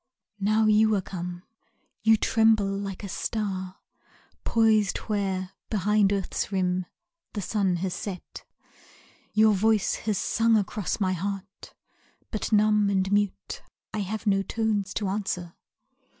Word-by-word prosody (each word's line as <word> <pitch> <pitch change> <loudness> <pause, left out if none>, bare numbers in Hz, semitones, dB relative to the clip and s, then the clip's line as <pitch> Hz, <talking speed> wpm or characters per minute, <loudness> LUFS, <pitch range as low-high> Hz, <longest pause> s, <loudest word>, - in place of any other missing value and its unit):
Now 215 +2 +2
you 215 0 +4
are 195 - +1
come! 180 -1 -6 0.6
You 220 0 +5
tremble 220 -1 +3
like 195 0 -5
a - - -4
star 190 -2 -3 0.7
Poised 220 -3 +3
where, 190 -3 -2 0.2
behind 210 -1 +2
earth's 195 0 -2
rim, 185 -2 0 0.5
the 205 - -3
sun 195 -1 +1
has 180 +1 -2
set. 190 -3 -7 0.9
Your 215 0 +5
voice 215 +1 +2 0.2
has 205 - +1
sung 225 +3 +2
across 205 0 -2
my 185 -2 +1
heart, 195 +2 -6 0.6
but 215 - -3
numb 210 -1 +4
And 190 -1 +1
mute, 205 -1 -1 0.3
I 215 - -2
have 210 +3 -4
no 195 -2 +3
tones 210 -2 -1
to 205 - -1
answer. 190 -3 -3
200 Hz, 130 wpm, -26 LUFS, 190-215 Hz, 0.9 s, You